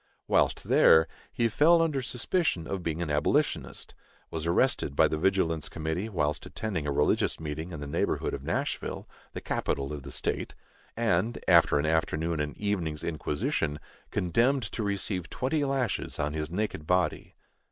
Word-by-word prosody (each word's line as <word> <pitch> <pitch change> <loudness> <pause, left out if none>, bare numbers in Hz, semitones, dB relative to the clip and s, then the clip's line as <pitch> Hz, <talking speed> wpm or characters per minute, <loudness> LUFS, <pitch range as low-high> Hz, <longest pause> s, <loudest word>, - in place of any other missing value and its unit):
Whilst - - +2
there, 80 0 +6 0.2
he 115 - +1
fell 155 +9 +5
under 155 -5 +1
suspicion 125 - 0
of 95 +1 -3
being 85 0 -2
an 80 - -3
abolitionist, 75 0 0 0.4
was 80 0 -3
arrested 85 - +1
by 80 - +5
the 75 - -2
vigilance 80 -4 +1
committee 80 +6 -3
whilst 75 -7 -1
attending 95 -9 -3
a - - 0
religious 75 +1 +1
meeting 80 +2 -5
in 80 -4 -6
the - - -4
neighborhood 70 - -1
of - - -4
Nashville, - - -3 0.3
the - - -5
capital 70 +1 -2
of 75 - -5
the 70 +1 -9
state, - - -2 0.4
and, 115 0 +1
after 75 - +6
an 75 - 0
afternoon 80 0 0
and 75 0 -3
evening's 90 -7 -2
inquisition, 75 -1 -1 0.3
condemned 120 +10 +2
to - - -3
receive 100 -3 -2
twenty 145 +4 -1
lashes 135 -5 -1
on 75 0 -1
his 75 -1 -3
naked 90 -4 -3
body. 90 0 0
85 Hz, 160 wpm, -28 LUFS, 75-110 Hz, 0.4 s, there